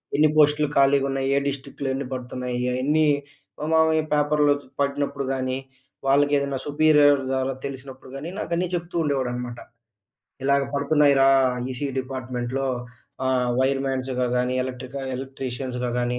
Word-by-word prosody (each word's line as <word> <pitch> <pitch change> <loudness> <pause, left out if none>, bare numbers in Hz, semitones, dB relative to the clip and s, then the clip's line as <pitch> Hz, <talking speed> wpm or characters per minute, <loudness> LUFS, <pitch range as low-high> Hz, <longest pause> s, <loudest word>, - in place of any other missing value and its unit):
ఎన్ని 155 +1 +5
పోస్టులు 150 0 +4
ఖాళీగా 140 0 +4
ఉన్నాయి, 135 0 -1
ఏ - - +4
డిస్ట్రిక్ట్‌లో 140 0 -4
ఎన్ని 135 -1 -4
పడుతున్నాయి. 125 0 -4
అయి 125 - -1
అన్ని 155 +3 +3 0.5
మా - - -3
మామయ్య 160 0 +4
పేపర్లో 150 0 +3 0.3
పడినప్పుడు 140 0 -1
గాని, 130 -1 -2 0.5
వాళ్ళకి 145 +1 +4
ఏదైనా 140 -1 -2
సుపీరియర్ 145 -1 +5
ద్వారా 130 0 0
తెలిసినప్పుడు 130 -1 -8
కానీ, 145 +5 -5
నాకన్నీ 170 +1 -1
చెప్తూ 175 0 -5
ఉండేవాడనమాట. 125 -4 -2 0.9
ఇలాగ 140 0 +3
పడుతున్నాయిరా, 140 -1 +4 0.4
ఈసీఈ 135 +2 -4
డిపార్ట్మెంట్‌లో 130 0 -3 0.6
ఆహ్, 130 -1 +1
వైర్ 135 +1 +2
మాన్స్‌గా 130 -1 -1
గాని, 125 +1 0
ఎలక్ట్రికల్ 130 +1 -6
ఎలక్ట్రీషియన్స్‌గా 130 -1 -4
గాని 120 0 -1
135 Hz, 130 wpm, -24 LUFS, 130-145 Hz, 0.9 s, ఎన్ని